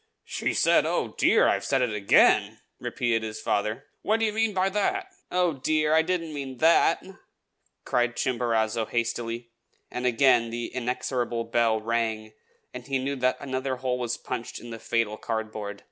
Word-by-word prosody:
"She -, -, -2 dB
said, -, -, +4 dB
'Oh, -, -, -1 dB
dear! -, -, +5 dB
I've -, -, +1 dB
said 135 Hz, -2 st, +1 dB
it 120 Hz, -3 st, -1 dB
again!'" 100 Hz, -1 st, +4 dB, 0.2 s
repeated 115 Hz, -2 st, -1 dB
his 110 Hz, -1 st, -5 dB
father. 110 Hz, +7 st, -1 dB, 0.2 s
"What 220 Hz, +1 st, +1 dB
do 225 Hz, -, +2 dB
you 215 Hz, -, -1 dB
mean 225 Hz, 0 st, +1 dB
by 190 Hz, -1 st, +1 dB
that?" 375 Hz, -, -1 dB, 0.2 s
"Oh, 180 Hz, -2 st, +2 dB
dear! 155 Hz, +3 st, +1 dB
I 160 Hz, -, +6 dB
didn't 165 Hz, -2 st, -2 dB
mean 135 Hz, -3 st, -6 dB
that," 165 Hz, +2 st, +4 dB, 0.8 s
cried 120 Hz, -1 st, +1 dB
Chimborazo 115 Hz, -3 st, 0 dB
hastily; 115 Hz, 0 st, -3 dB, 0.4 s
and 125 Hz, 0 st, -2 dB
again 120 Hz, -1 st, +4 dB
the 120 Hz, +1 st, -5 dB
inexorable 125 Hz, -1 st, -2 dB
bell 115 Hz, -1 st, +1 dB
rang, 110 Hz, -1 st, -2 dB, 0.4 s
and 125 Hz, 0 st, -8 dB
he 135 Hz, -1 st, 0 dB
knew 135 Hz, +2 st, -2 dB
that 130 Hz, 0 st, +1 dB
another 130 Hz, -1 st, -2 dB
hole 125 Hz, -1 st, -2 dB
was 120 Hz, -2 st, -2 dB
punched 120 Hz, -2 st, -5 dB
in 120 Hz, -, -10 dB
the 115 Hz, -, -7 dB
fatal 115 Hz, -1 st, -1 dB
cardboard. 110 Hz, -3 st, -4 dB
120 Hz, 165 wpm, -26 LUFS, 115-140 Hz, 0.8 s, I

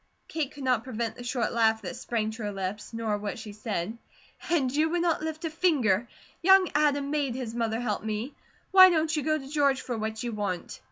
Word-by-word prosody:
Kate 305 Hz, -4 st, -2 dB
could 285 Hz, -, -9 dB
not 250 Hz, -3 st, +2 dB
prevent 230 Hz, -3 st, -3 dB
the 245 Hz, -, -9 dB
short 245 Hz, 0 st, -1 dB
laugh 220 Hz, -1 st, +2 dB
that 180 Hz, -, -5 dB
sprang 220 Hz, -2 st, -2 dB
to 225 Hz, +1 st, -9 dB
her 205 Hz, -1 st, -2 dB
lips, 195 Hz, +2 st, -5 dB
nor 225 Hz, -2 st, -2 dB
what 205 Hz, +4 st, -4 dB
she 220 Hz, -2 st, -8 dB
said: 210 Hz, -1 st, -3 dB, 0.5 s
"And 285 Hz, -6 st, +1 dB
you 310 Hz, +2 st, +3 dB
would 345 Hz, +1 st, 0 dB
not 335 Hz, -3 st, +1 dB
lift 315 Hz, +1 st, -4 dB
a -, -, 0 dB
finger; 255 Hz, -, +2 dB, 0.3 s
young 380 Hz, +1 st, +6 dB
Adam 285 Hz, -1 st, +2 dB
MADE 285 Hz, -5 st, 0 dB
his 250 Hz, -3 st, -4 dB
MOTHER 230 Hz, -1 st, -1 dB
help 215 Hz, -5 st, -2 dB
me. 220 Hz, +5 st, -3 dB, 0.4 s
Why 375 Hz, -1 st, +10 dB
don't 320 Hz, -2 st, +1 dB
you 300 Hz, -, 0 dB
go 310 Hz, +2 st, +1 dB
to 270 Hz, -3 st, -9 dB
George 280 Hz, -2 st, +2 dB
for 245 Hz, -, -4 dB
what 220 Hz, 0 st, -3 dB
you 240 Hz, -, -2 dB
want?" 205 Hz, -5 st, -4 dB
245 Hz, 220 wpm, -28 LUFS, 220-300 Hz, 0.5 s, Why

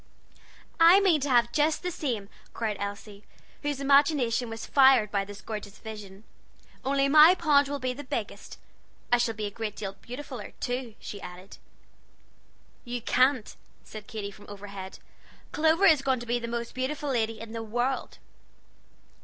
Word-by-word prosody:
"I 335 Hz, +4 st, +8 dB
mean 360 Hz, -7 st, +3 dB
to 285 Hz, -, -1 dB
have 240 Hz, -2 st, +3 dB
just 305 Hz, +4 st, +1 dB
the 360 Hz, -, -2 dB
same," 245 Hz, -, -3 dB, 0.3 s
cried 220 Hz, -2 st, -2 dB
Elsie, 200 Hz, 0 st, -6 dB, 0.4 s
whose 290 Hz, -2 st, -2 dB
imagination 275 Hz, -4 st, +3 dB
was 225 Hz, 0 st, -6 dB
fired 265 Hz, -6 st, +5 dB
by 200 Hz, -1 st, 0 dB
this 205 Hz, +1 st, -10 dB
gorgeous 210 Hz, -2 st, -7 dB
vision, 210 Hz, -3 st, -10 dB, 0.6 s
"only 275 Hz, +1 st, +2 dB
my 310 Hz, +5 st, +8 dB
pond 290 Hz, -5 st, +3 dB
will 285 Hz, 0 st, -3 dB
be 255 Hz, -2 st, -2 dB
the 290 Hz, +3 st, -8 dB
biggest. 230 Hz, -7 st, -5 dB, 0.5 s
I 245 Hz, -, +5 dB
shall 235 Hz, -2 st, 0 dB
be 210 Hz, 0 st, -3 dB
a 205 Hz, -, -4 dB
great 215 Hz, 0 st, -5 dB
deal 195 Hz, -2 st, -5 dB
beautifuller, 250 Hz, +2 st, -8 dB
too," 245 Hz, -2 st, -3 dB
she 200 Hz, -, -8 dB
added. 180 Hz, +2 st, -11 dB, 1.2 s
"You 245 Hz, -1 st, -4 dB
can't," 255 Hz, 0 st, +1 dB, 0.3 s
said 215 Hz, -1 st, -10 dB
Katy 205 Hz, -2 st, -5 dB
from 205 Hz, +1 st, -15 dB
overhead. 200 Hz, -2 st, -8 dB, 0.5 s
"Clover 320 Hz, +5 st, +3 dB
is 315 Hz, -7 st, +6 dB
going 265 Hz, -2 st, +1 dB
to 240 Hz, -, -8 dB
be 240 Hz, +1 st, 0 dB
the 235 Hz, -, -5 dB
most 235 Hz, 0 st, -4 dB
beautiful 285 Hz, +3 st, -3 dB
lady 225 Hz, -3 st, -1 dB
in 225 Hz, 0 st, -8 dB
the 230 Hz, -, -4 dB
world." 240 Hz, +4 st, -2 dB
240 Hz, 160 wpm, -27 LUFS, 210-280 Hz, 1.2 s, I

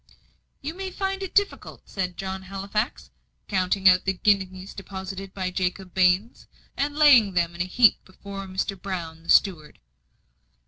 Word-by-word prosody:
"You 300 Hz, +3 st, -4 dB
may 380 Hz, +2 st, -5 dB
find 385 Hz, +1 st, -3 dB
it 385 Hz, -, -6 dB
difficult," 405 Hz, 0 st, -1 dB
said 185 Hz, -3 st, -4 dB
John 190 Hz, 0 st, -4 dB
Halifax, 195 Hz, +5 st, -4 dB, 0.4 s
counting 190 Hz, 0 st, +1 dB
out 185 Hz, -1 st, +5 dB
the 195 Hz, -, +1 dB
guineas 190 Hz, -1 st, 0 dB
deposited 195 Hz, 0 st, -7 dB
by 185 Hz, -2 st, -3 dB
Jacob 185 Hz, 0 st, -3 dB
Baines, 185 Hz, +4 st, +2 dB, 0.3 s
and 290 Hz, +1 st, -1 dB
laying 250 Hz, -11 st, +6 dB
them 170 Hz, -1 st, +1 dB
in 170 Hz, -, -5 dB
a -, -, +1 dB
heap 225 Hz, +5 st, +4 dB
before 195 Hz, +1 st, -9 dB
Mr. 190 Hz, +1 st, -2 dB
Brown, 170 Hz, -4 st, -5 dB
the 165 Hz, -, -17 dB
steward. 160 Hz, -7 st, +3 dB
190 Hz, 150 wpm, -25 LUFS, 185-210 Hz, 0.4 s, laying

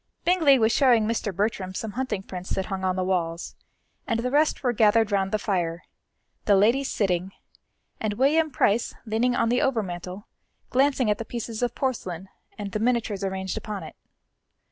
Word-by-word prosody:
Bingley 330 Hz, -6 st, +5 dB
was 225 Hz, -2 st, +3 dB
showing 240 Hz, -4 st, +4 dB
Mr. 220 Hz, -2 st, -1 dB
Bertram 195 Hz, -1 st, -2 dB
some 220 Hz, +2 st, -4 dB
hunting 220 Hz, -4 st, -3 dB
prints 185 Hz, -1 st, -7 dB
that 190 Hz, -, -1 dB
hung 190 Hz, -1 st, -4 dB
on 185 Hz, -1 st, +1 dB
the 185 Hz, -, -1 dB
walls, 170 Hz, -2 st, -2 dB, 0.5 s
and 230 Hz, -3 st, 0 dB
the 250 Hz, +2 st, -2 dB
rest 295 Hz, +1 st, +2 dB
were 245 Hz, -2 st, +2 dB
gathered 220 Hz, 0 st, +3 dB
round 195 Hz, -1 st, +1 dB
the 215 Hz, -, +2 dB
fire, 175 Hz, -5 st, -2 dB, 0.6 s
the 205 Hz, -, +5 dB
ladies 235 Hz, +8 st, +3 dB
sitting, 190 Hz, -2 st, -1 dB, 0.7 s
and 215 Hz, -1 st, -1 dB
William 310 Hz, +6 st, +3 dB
Price 230 Hz, -4 st, +1 dB
leaning 235 Hz, +3 st, +1 dB
on 230 Hz, -, +1 dB
the 245 Hz, +1 st, +2 dB
overmantel 190 Hz, -6 st, -2 dB, 0.5 s
glancing 265 Hz, -3 st, +3 dB
at 205 Hz, -, -1 dB
the -, -, -2 dB
pieces 230 Hz, 0 st, -5 dB
of 245 Hz, -1 st, -1 dB
porcelain 190 Hz, -9 st, -3 dB, 0.3 s
and 205 Hz, -1 st, -5 dB
the 215 Hz, -, -2 dB
miniatures 225 Hz, -4 st, 0 dB
arranged 190 Hz, +1 st, -3 dB
upon 215 Hz, -2 st, -5 dB
it. -, -, -10 dB
215 Hz, 175 wpm, -25 LUFS, 190-245 Hz, 0.7 s, Bingley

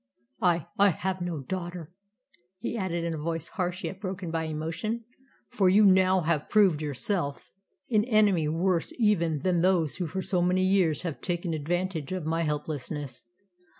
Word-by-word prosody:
I 170 Hz, -4 st, +2 dB
I 200 Hz, 0 st, +7 dB
have 185 Hz, +1 st, -2 dB
no 175 Hz, -4 st, -3 dB
daughter," 175 Hz, +1 st, -5 dB, 0.7 s
he 235 Hz, +4 st, -4 dB
added 180 Hz, -5 st, -2 dB
in 170 Hz, -1 st, -1 dB
a 160 Hz, -, -4 dB
voice 165 Hz, 0 st, -3 dB
harsh 180 Hz, 0 st, -3 dB
yet 190 Hz, +1 st, -5 dB
broken 185 Hz, -3 st, -4 dB
by 165 Hz, -1 st, -1 dB
emotion, 165 Hz, +9 st, -3 dB, 0.5 s
"for 190 Hz, -3 st, +2 dB
you 205 Hz, +3 st, +6 dB
have 195 Hz, -, +8 dB
now 185 Hz, -4 st, +3 dB
proved 190 Hz, -8 st, +4 dB
yourself 145 Hz, +1 st, -2 dB, 0.4 s
an 215 Hz, -1 st, +3 dB
enemy 210 Hz, -9 st, +3 dB
worse 170 Hz, +2 st, 0 dB
even 170 Hz, -, +2 dB
than 180 Hz, -2 st, +2 dB
those 175 Hz, -5 st, +2 dB
who 180 Hz, -3 st, -2 dB
for 190 Hz, +5 st, -4 dB
so 180 Hz, -2 st, +1 dB
many 180 Hz, +1 st, +2 dB
years 185 Hz, -5 st, +2 dB
have 165 Hz, -5 st, -4 dB
taken 175 Hz, -2 st, -2 dB
advantage 165 Hz, 0 st, -2 dB
of 185 Hz, -4 st, -3 dB
my 165 Hz, +1 st, 0 dB
helplessness." 150 Hz, -3 st, -4 dB
175 Hz, 165 wpm, -28 LUFS, 160-190 Hz, 0.7 s, have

